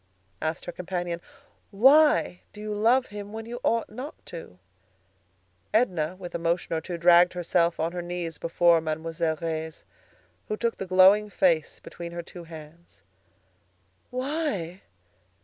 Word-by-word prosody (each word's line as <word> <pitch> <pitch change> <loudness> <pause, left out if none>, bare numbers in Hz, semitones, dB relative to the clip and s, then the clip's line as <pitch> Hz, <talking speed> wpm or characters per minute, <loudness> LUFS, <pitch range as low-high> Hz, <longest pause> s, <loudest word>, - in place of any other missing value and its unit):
asked 160 +2 -2
her - - -4
companion. 175 -1 -4 0.5
"Why 275 - +5
do 210 - -12
you 210 0 -4
love 235 +5 +3
him 205 0 -7
when 225 0 -6
you 240 +1 -6
ought 230 0 +1
not 255 +8 -8
to?" 165 - -10 1.2
Edna, 180 -8 +1
with 180 -2 -8
a - - -2
motion 170 +1 -1
or 160 - 0
two, 175 0 -5
dragged 175 +1 +6
herself 170 -1 +1
on 165 +1 0
her 175 0 -4
knees 175 -2 -5
before 170 0 +3
Mademoiselle 160 +1 -2
Reisz, 160 -1 -4 0.6
who 215 - -2
took 235 0 -1
the 195 - -5
glowing 190 +3 +6
face 170 -5 +1
between 170 0 -9
her 170 0 -5
two 175 0 -11
hands. 160 +1 -13 1.1
"Why? 255 - -3
175 Hz, 145 wpm, -26 LUFS, 165-210 Hz, 1.2 s, dragged